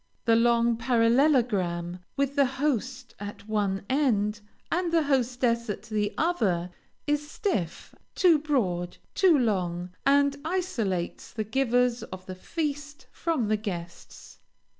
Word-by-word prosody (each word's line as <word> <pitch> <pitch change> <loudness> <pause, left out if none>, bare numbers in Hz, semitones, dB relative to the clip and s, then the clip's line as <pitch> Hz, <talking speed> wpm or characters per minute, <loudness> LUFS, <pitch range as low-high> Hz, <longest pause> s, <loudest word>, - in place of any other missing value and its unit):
The 230 -1 +5
long 235 0 +3
parallelogram, 230 - +2 0.2
with 280 0 0
the 280 -2 +4
host 260 -2 -2
at 205 0 -8
one 200 -3 -1
end 215 -7 +1 0.3
and 350 0 0
the 330 -1 +3
hostess 245 -4 +1
at 205 0 -4
the 210 -2 -1
other, 195 - 0 0.3
is 295 0 -1
stiff, 205 - -3 0.2
too 345 -5 +5
broad, 195 - -1 0.2
too 360 -5 +5
long, 180 -7 -1
and 280 0 +3
isolates 250 - -2
the 220 - -3
givers 245 +1 +1
of 185 0 -9
the 185 - -6
feast 290 - -4
from 320 -10 -1
the 215 0 +2
guests. 175 -5 -8
235 Hz, 125 wpm, -27 LUFS, 205-285 Hz, 0.3 s, The